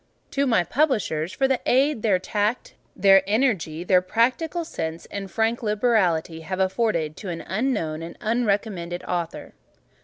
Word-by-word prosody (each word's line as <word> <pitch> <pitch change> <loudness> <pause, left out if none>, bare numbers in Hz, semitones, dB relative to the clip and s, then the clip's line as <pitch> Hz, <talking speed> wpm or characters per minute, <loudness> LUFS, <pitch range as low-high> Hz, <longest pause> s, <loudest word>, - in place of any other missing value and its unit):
To 280 0 +1
my 225 -8 +3
Publishers, 185 - 0
for 270 - +1
the 265 -1 +1
aid 270 -1 +3
their 210 -4 +3
tact, 210 +5 -2 0.2
their 195 0 +6
energy, 200 - 0
their 180 0 +4
practical 255 - 0
sense 160 - -5
and 195 -1 -5
frank 225 +5 0
liberality 205 -8 +1
have 185 +4 -5
afforded 190 -5 0
an 175 -4 -4
unknown 190 -7 -2
and 165 +1 -8
unrecommended 205 -6 -1
Author. 170 -2 -4
200 Hz, 135 wpm, -24 LUFS, 175-235 Hz, 0.2 s, their